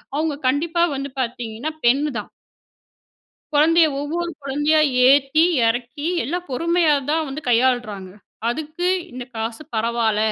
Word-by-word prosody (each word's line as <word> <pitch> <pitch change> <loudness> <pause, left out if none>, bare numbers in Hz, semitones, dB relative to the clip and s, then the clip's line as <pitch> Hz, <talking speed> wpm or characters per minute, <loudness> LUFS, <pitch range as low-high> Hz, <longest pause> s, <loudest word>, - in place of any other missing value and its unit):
அவங்க 310 0 0
கண்டிப்பா 330 +6 +1
வந்து 275 +1 -4
பாத்தீங்கன்னா, 240 +3 -4
பெண்னு 280 +5 +3
தான் 210 - -9 1.2
குழந்தைய 320 +2 +5
ஒவ்வொரு 335 +4 -3
குழந்தையா 295 +3 +2 0.3
ஏத்தி, 280 +3 +4 0.2
இறக்கி 245 +6 -2 0.2
எல்லாம் 350 +8 -4
பொறுமையா 335 +2 +2 0.2
தான் 320 0 +1
வந்து 275 +3 -6
கையாளுறாங்க. 230 -6 +1 0.4
அதுக்கு 310 +7 -3 0.2
இந்த 250 0 -6
காசு 225 +3 -4
பரவால 225 -1 0
280 Hz, 115 wpm, -21 LUFS, 240-315 Hz, 1.2 s, குழந்தைய